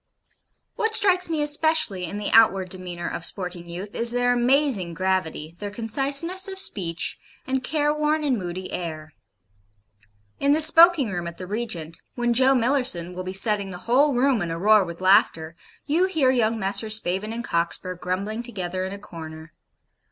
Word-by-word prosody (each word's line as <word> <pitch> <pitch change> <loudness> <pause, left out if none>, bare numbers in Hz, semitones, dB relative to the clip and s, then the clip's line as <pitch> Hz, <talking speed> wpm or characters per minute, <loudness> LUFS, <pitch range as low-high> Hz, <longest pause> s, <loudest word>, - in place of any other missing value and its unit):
What 445 0 +2
strikes 370 -4 +3
me 310 -2 -1
especially 295 - +2
in 195 +5 -6
the 210 - -4
outward 195 -5 +4
demeanour 180 -2 -3
of - - -6
sporting 180 -2 -4
youth 185 +4 -8
is 235 0 +3
their 245 +1 +1
amazing 245 - +1
gravity, 170 -4 -3
their 205 - -5
conciseness 280 - +2
of 385 0 -7
speech, 175 - -2 0.3
and 265 0 -2
careworn 300 +1 -1
and 275 -4 0
moody 185 -2 -6
air. 160 -3 -6 1.3
In 280 +1 +2
the 310 - +2
smoking 325 - +6
room 175 -2 -5
at 170 - -9
the 185 - -8
'Regent,' 185 -6 -5
when 240 -1 0
Joe 260 +2 +3
Millerson 240 -9 0
will 185 - -6
be 185 - -6
setting 200 0 +4
the 180 - -8
whole 275 +4 +2
room 250 -2 +1
in 170 - -3
a 165 - -4
roar 210 +3 +4
with 170 0 -9
laughter, 185 -4 +2 0.3
you 330 +6 +1
hear 310 -9 +1
young 230 -3 0
Messrs. 205 +1 +2
Spavin 210 +1 -2
and 230 +1 -5
Cockspur 170 0 -3
grumbling 190 +5 -4
together 185 -6 -5
in 190 - -6
a - - -7
corner. 160 -4 -11
210 Hz, 170 wpm, -23 LUFS, 180-270 Hz, 1.3 s, smoking